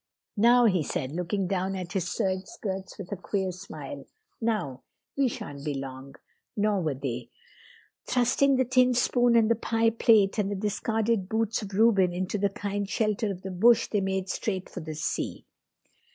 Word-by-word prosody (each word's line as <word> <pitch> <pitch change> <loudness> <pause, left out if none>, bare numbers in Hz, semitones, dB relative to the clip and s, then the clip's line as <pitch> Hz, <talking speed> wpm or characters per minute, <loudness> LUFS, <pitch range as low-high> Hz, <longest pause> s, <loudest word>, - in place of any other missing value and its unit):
"Now," 240 +3 +6
he 185 -6 +3
said, 135 -2 -3
looking 180 +4 -2
down 190 +1 -1
at 180 -2 -5
his 180 -3 -1
serge 185 0 -1
skirts 190 -2 -6
with 195 -1 -8
a - - -1
queer 190 +1 -2
smile, 150 -7 -9 0.3
"now 210 - -1 0.3
we 275 -1 +3
shan't 145 - -6
be 150 -2 -2
long." 135 0 -7 0.4
Nor 205 -2 +2
were 155 -5 -1
they. 125 -3 -5 0.8
Thrusting 260 +3 +3
the 260 0 +2
tin 255 0 +3
spoon 245 0 +3
and 225 -1 +5
the 230 - +4
pie 225 0 +1
plate 220 -3 +4
and 200 -1 +1
the 205 - -2
discarded 210 0 -1
boots 225 0 0
of 200 -2 -7
Reuben 200 -5 +4
into 185 +3 -2
the 200 0 +2
kind 200 0 -3
shelter 215 0 0
of 190 -2 -6
the 190 - -5
bush 225 +6 +4
they 205 - +1
made 190 0 -1
straight 190 -1 -3
for - - -7
the 155 -2 -6
sea. 155 - -3
195 Hz, 180 wpm, -27 LUFS, 180-225 Hz, 0.8 s, Now